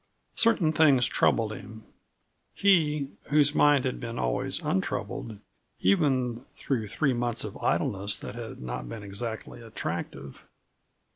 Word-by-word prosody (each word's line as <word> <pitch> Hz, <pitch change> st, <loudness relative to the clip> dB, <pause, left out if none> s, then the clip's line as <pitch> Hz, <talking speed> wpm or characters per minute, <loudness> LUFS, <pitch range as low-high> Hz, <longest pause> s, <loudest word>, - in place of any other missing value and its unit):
Certain 200 Hz, -9 st, +3 dB
things 145 Hz, -6 st, +5 dB
troubled 110 Hz, -2 st, +2 dB
him 110 Hz, 0 st, -10 dB, 0.7 s
he, 150 Hz, -8 st, +3 dB, 0.2 s
whose 150 Hz, 0 st, +4 dB
mind 145 Hz, -3 st, +4 dB
had 130 Hz, -, -2 dB
been 115 Hz, -1 st, -5 dB
always -, -, -1 dB
untroubled 105 Hz, +3 st, -2 dB, 0.4 s
even 125 Hz, +4 st, +2 dB, 0.2 s
through 115 Hz, -6 st, -2 dB
three 135 Hz, +6 st, +1 dB
months 120 Hz, -1 st, -1 dB
of -, -, -6 dB
idleness 100 Hz, +1 st, 0 dB
that -, -, -7 dB
had 120 Hz, -1 st, -7 dB
not 60 Hz, -1 st, -5 dB
been 115 Hz, -3 st, -7 dB
exactly 110 Hz, +4 st, -5 dB
attractive. 105 Hz, -, -6 dB
120 Hz, 125 wpm, -28 LUFS, 110-145 Hz, 0.7 s, things